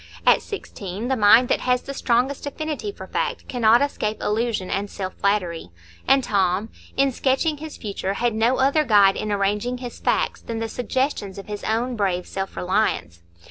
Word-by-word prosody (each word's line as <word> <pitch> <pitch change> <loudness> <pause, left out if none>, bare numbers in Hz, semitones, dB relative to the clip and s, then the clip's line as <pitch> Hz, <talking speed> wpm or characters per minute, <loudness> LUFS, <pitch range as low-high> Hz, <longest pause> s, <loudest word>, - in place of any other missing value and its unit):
At - - +6
sixteen, 210 - -6
the 265 - +2
mind 225 +2 +6
that - - +2
has 250 0 +1
the 275 - -6
strongest 265 +2 0
affinity 310 +7 -4
for - - -10
fact 480 0 -3
cannot 235 +1 +4
escape 215 -7 -2
illusion 215 -3 -1
and 200 +1 -1
self 185 -2 -5
flattery; 180 - -1 0.4
and 270 0 +5
Tom, 195 0 +1 0.3
in 275 0 +3
sketching 270 +5 +1
his 310 +1 -8
future, 200 -2 -3
had 240 +2 0
no 230 +4 +2
other 280 +4 +3
guide 205 -6 +5
in 215 - -3
arranging 205 +5 0
his 245 -1 -8
facts - - 0
than 230 - -5
the 225 0 -2
suggestions 245 -4 -2
of 195 - -7
his 210 -1 -6
own 240 +3 0
brave 185 -4 0
self 195 0 -5
reliance. 180 - 0
225 Hz, 180 wpm, -23 LUFS, 200-260 Hz, 0.4 s, At